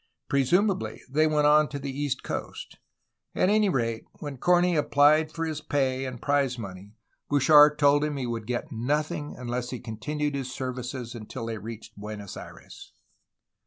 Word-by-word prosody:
Presumably, 180 +9 +1
they 155 +4 +2
went 150 -1 +2
on 150 +1 +5
to 145 - -5
the 140 -1 -5
east 145 -2 -2
coast; - - -6 0.6
at 185 - +3
any 210 -1 +3
rate, 115 -7 -1
when 145 -4 -7
Corney 175 +2 +3
applied 150 +1 +4
for 165 +1 -3
his 155 -2 -4
pay 135 -3 0
and 130 -2 -6
prize 140 -2 +1
money 100 -1 -9 0.3
Bouchard 150 +1 +6
told 145 0 +4
him 150 -1 -2
he 130 - -2
would 115 -2 -4
get 120 -1 -3
nothing 145 +5 -2
unless 125 0 -3
he 125 - -5
continued 145 +7 -3
his 135 -2 -4
services 125 -1 -5
until 115 0 -7
they 115 -1 -4
reached 115 +1 -9
Buenos 105 -1 -7
Aires. - - -12
140 Hz, 160 wpm, -27 LUFS, 120-150 Hz, 0.6 s, Bouchard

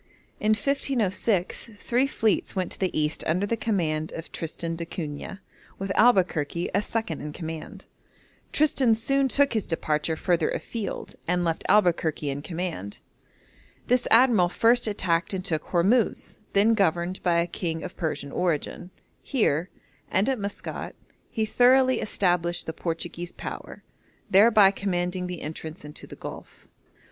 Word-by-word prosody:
In 215 +1 +3
1506 220 -6 0
three 245 +5 +1
fleets 220 -6 0
went 185 -2 -1
to - - -8
the 185 -4 0
East 150 +1 -1
under 180 +5 +1
the 230 - 0
command 160 -9 -1
of 165 - -7
Tristan 165 +1 -4
d'Acunha, 165 +2 -6 0.4
with 195 0 -3
Albuquerque 180 -8 +2
as 200 +2 0
second 220 -9 -2
in 150 - -5
command. 160 -1 -7 0.7
Tristan 270 -6 +3
soon 275 +5 +1
took 280 +1 +3
his 220 -3 -1
departure 160 -1 0
further 170 0 +1
afield, 220 -5 -4
and 180 +1 +1
left 165 -1 -1
Albuquerque 165 -7 +2
in 140 +1 -4
command. 165 - -5 0.9
This 250 0 +2
admiral 225 -7 +5
first 230 +5 +3
attacked 180 -3 0
and 185 -1 -4
took 160 -5 -1
Hormuz, 200 +7 +1
then 210 +3 +5
governed 180 -3 +1
by 175 -2 +2
a 170 - +3
king 165 -2 -4
of 185 - -7
Persian 155 -4 -3
origin. 175 +1 -2 0.3
Here, 180 - 0 0.4
and 190 +3 +2
at 265 -3 0
Maskat, 200 0 -5 0.3
he 220 -2 -1
thoroughly 255 +3 +4
established 175 -4 0
the 160 - -4
Portuguese 170 +1 -4
power, - - -8 0.5
thereby 205 0 +7
commanding 180 -2 -2
the 180 -1 -6
entrance 155 0 -7
into 150 - -10
the - - -10
Gulf. - - -10
180 Hz, 140 wpm, -26 LUFS, 165-220 Hz, 0.9 s, thereby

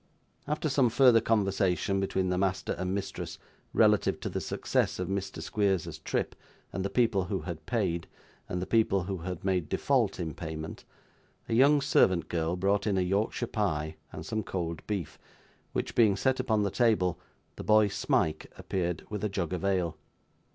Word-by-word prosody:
After 150 +1 -1
some 135 -4 +3
further 125 -1 +6
conversation 100 -3 +1
between 95 -1 0
the 90 - 0
master 95 -1 0
and 90 +1 -3
mistress 100 -1 -5 0.3
relative - - +3
to - - -3
the - - -3
success - - 0
of - - -3
Mr. 100 0 -3
Squeers's 100 -5 0
trip - - -2 0.4
and 95 - -2
the 100 - -1
people 110 -6 +2
who 95 0 -2
had 80 -3 -7
paid, 90 -8 -1 0.4
and 90 - -2
the 90 - -2
people 105 -4 +2
who 95 +1 -3
had 90 +1 -6
made 90 -5 0
default - - +1
in 80 -2 -3
payment, 80 -1 -6 0.6
a - - -2
young 140 +5 +5
servant 90 - +3
girl 85 0 0
brought 100 +3 +1
in 100 -2 +1
a - - +3
Yorkshire 100 +6 0
pie 80 -9 -1 0.2
and - - -7
some 110 - -2
cold 85 -4 -4
beef, 90 -7 -3 0.5
which - - -2
being 110 -4 +5
set 130 +6 +1
upon 110 -5 +1
the 100 - 0
table, 105 -7 +2 0.4
the - - -7
boy 110 -1 +5
Smike 80 -5 0
appeared 90 -3 -2
with 105 -1 -4
a 105 - +1
jug 95 -3 -2
of 90 - -3
ale. 90 -4 0
95 Hz, 175 wpm, -29 LUFS, 90-110 Hz, 0.6 s, further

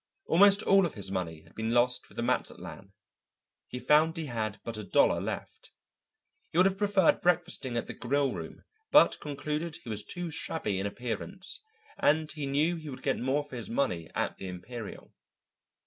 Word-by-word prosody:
Almost 200 +3 +6
all 195 -2 +5
of - - -10
his 100 -3 -2
money 85 -5 -3
had - - -21
been 110 +1 -1
lost 125 +1 +2
with - - -18
the - - -2
Mazatlan; - - -3 0.8
he - - -6
found 155 +5 +4
he 160 - -3
had 110 -5 -3
but 115 - -5
a 110 - -5
dollar 95 - +3
left. - - -6 0.8
He - - -3
would 185 - +7
have 195 0 +1
preferred 200 -4 +3
breakfasting 175 -8 +1
at 115 - -1
the - - -6
Grillroom, 140 +3 -2 0.3
but 300 - +6
concluded 150 +3 -3
he 120 - -10
was 105 -1 -2
too 175 -2 -5
shabby 110 -10 -2
in 100 - -1
appearance, 125 - -4 0.4
and 155 +1 +3
he 150 -3 -4
knew 155 +5 +2
he 155 -2 -8
would 130 - -8
get - - 0
more 135 +4 +1
for 145 -3 -10
his 115 - -6
money 90 - -1
at - - -1
the 95 - -6
Imperial. 105 +5 -8
140 Hz, 180 wpm, -30 LUFS, 110-165 Hz, 0.8 s, would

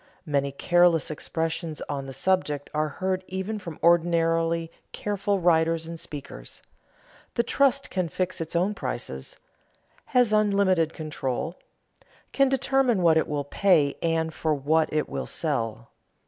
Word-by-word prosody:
Many 140 -3 0
careless 175 +1 +3
expressions 160 +1 -3
on 140 -2 -4
the - - -6
subject 145 0 0
are 155 0 +1
heard 185 +4 -2
even 190 +3 -3
from 170 -5 -8
ordinarily 165 -1 +2 0.2
careful 205 -1 -1
writers 165 -1 +2
and 165 0 -7
speakers: 140 - -9 0.7
"The 235 - +2
trust 275 +3 +1
can 185 -3 -1
fix 185 +1 -2
its 165 +1 -5
own 185 +5 +2
prices," 120 - -5 0.7
"has 245 -4 +3
unlimited 200 -6 +2
control," 150 -1 -3 0.8
"can 275 -1 +3
determine 265 -6 +2
what 165 -2 +5
it 160 - +2
will 145 -2 -2
pay 150 -2 +2
and 165 -1 0
for 155 -1 0
what 155 +3 +1
it 155 -1 0
will - - -4
sell." 115 -7 -2
165 Hz, 135 wpm, -26 LUFS, 150-190 Hz, 0.8 s, what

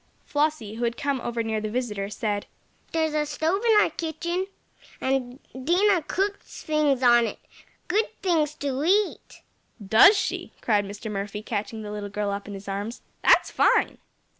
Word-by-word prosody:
Flossie, 290 -8 -1
who 240 - -3
had 235 0 -1
come 280 -3 -1
over 235 -1 -2
near 220 -1 -2
the 215 - -3
visitor, 210 -4 -3
said: 205 0 -2 0.4
"There's 320 -1 0
a 305 0 +1
stove 320 +6 0
in 445 -3 +6
our - - +2
kitchen, 340 +3 -3 0.5
and 260 -1 -1 0.2
Dinah 345 +6 +2
cooks 400 +2 -3
things 295 -4 +1
on 240 -1 +6
it - - -6 0.5
good 425 +4 +2 0.2
things 310 -5 +1
to 280 -2 -2
eat!" 400 +5 0 0.4
"Does 220 - +6
she?" 390 - -3
cried 205 -3 +1
Mr. 205 +2 -7
Murphy, 205 +1 -4
catching 220 0 -4
the 210 - -6
little 205 -1 -5
girl 205 0 -2
up 200 0 -5
in 205 - -6
his 195 +1 -10
arms. 205 +5 -4 0.2
"That's - - +5
fine!" - - +2
255 Hz, 165 wpm, -25 LUFS, 210-315 Hz, 0.5 s, in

